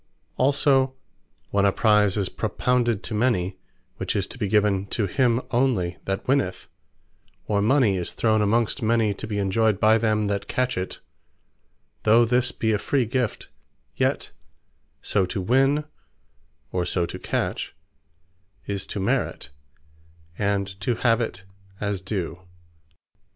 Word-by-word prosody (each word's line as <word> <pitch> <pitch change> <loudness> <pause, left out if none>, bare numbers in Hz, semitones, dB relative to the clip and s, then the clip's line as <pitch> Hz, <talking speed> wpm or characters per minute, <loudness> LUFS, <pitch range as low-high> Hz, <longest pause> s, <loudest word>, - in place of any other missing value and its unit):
Also 135 -1 +3 0.6
when 100 -1 +2
a 100 - +4
Prize 105 -1 +3
is 100 -3 0
propounded 120 +1 0
to 115 - -5
many, 105 -5 0 0.4
which 95 +1 -2
is 100 -3 +1
to - - -9
be 105 - 0
given 100 -1 +2
to 105 +1 0
him 120 +3 +2
onely 115 -9 +1
that 95 0 -3
winneth; 125 -9 0 0.8
or 100 -1 +1
mony 110 -3 +3
is 90 - -3
thrown 110 -2 +2
amongst 115 +5 +1
many, 110 -2 +2
to 105 - -7
be 105 -1 -3
enjoyed 100 +1 +1
by 110 +1 +5
them 110 -1 +1
that 100 -1 -2
catch 125 0 0
it; 90 0 -4 1.0
though 115 +2 +5
this 125 +2 +2
be 110 - -1
a 105 - +1
Free 135 +1 +1
Gift; 125 0 -2 0.5
yet - - 0 0.7
so 100 - +1
to 90 - -3
Win, 135 +9 +2 0.9
or 90 - 0
so 85 0 0
to - - -7
Catch, - - -3 0.9
is 100 -2 -3
to - - -4
Merit, 95 -6 -1 0.8
and 100 0 0 0.2
to 120 +4 0
have 115 0 +2
it 95 -5 -3 0.4
as 100 -2 -2
DUE. 95 -3 -3
105 Hz, 140 wpm, -24 LUFS, 100-120 Hz, 1.0 s, by